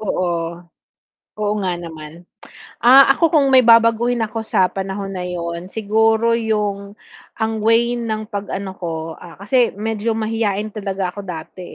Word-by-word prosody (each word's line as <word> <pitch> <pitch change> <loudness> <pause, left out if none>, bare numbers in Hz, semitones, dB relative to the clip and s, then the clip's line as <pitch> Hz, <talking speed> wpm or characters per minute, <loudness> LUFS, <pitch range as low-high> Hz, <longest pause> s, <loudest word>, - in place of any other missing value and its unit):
Oo, 170 -4 -2 0.8
oo 210 -1 0
nga 185 - 0
naman, 160 0 -10 0.6
ah, 265 +3 +8
ako 330 -2 +2
kung 295 -4 +4
may 255 - +7
babaguhin 230 +1 +4
ako 225 +1 -5
sa 185 -4 +2
panahon 195 +1 -5
na 180 - -4
'yon 170 0 -5
siguro 220 +1 +2
yung 210 -3 -2 0.4
ang 220 0 0
way 230 +2 +3
ng 220 -2 -4
pag 205 -1 -6
ano 195 -1 -4
ko, 175 -3 -5 0.2
ah, 170 - -13
kasi 240 +4 +2
medyo 220 +2 -2
mahiyain 215 -2 -2
talaga 195 -3 -3
ako 205 - -5
dati, 180 0 -8
210 Hz, 150 wpm, -19 LUFS, 185-225 Hz, 0.8 s, ah